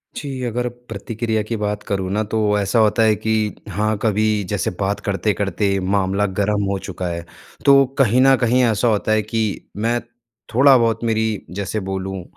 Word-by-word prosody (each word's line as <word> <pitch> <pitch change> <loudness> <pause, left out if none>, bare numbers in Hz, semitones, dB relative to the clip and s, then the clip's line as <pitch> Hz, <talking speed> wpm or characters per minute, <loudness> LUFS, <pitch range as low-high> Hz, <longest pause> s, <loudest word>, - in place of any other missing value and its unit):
जी, 135 -3 -5
अगर 120 +1 -2 0.2
प्रतिक्रिया 110 +1 -2
की 115 +2 -4
बात 105 0 -3
करूँ 95 -3 -2
ना 105 +1 +1
तो 105 -2 +2
ऐसा 100 +4 +1
होता 110 +1 +3
है 110 -1 +4
कि 110 +1 -2 0.4
हाँ 105 +3 -1
कभी 110 -1 +1 0.2
जैसे 100 -4 -1
बात 100 +1 -1
करते-करते 100 0 0
मामला 95 +1 0
गर्म 100 0 +1
हो 100 - 0
चुका 90 -1 -5
है। 85 -1 -4 0.4
तो 140 -1 +7
कहीं 125 -2 +4
न 135 0 +6
कहीं 125 +1 +3
ऐसा 115 0 +1
होता 110 -1 +1
है 110 0 +3
कि 110 +2 -2 0.4
मैं 115 +3 0 0.5
थोड़ा-बहुत 120 -3 +4
मेरी 110 -2 -1
जैसे 100 +2 -3
बोलूँ 95 -1 -4
105 Hz, 170 wpm, -20 LUFS, 100-115 Hz, 0.5 s, तो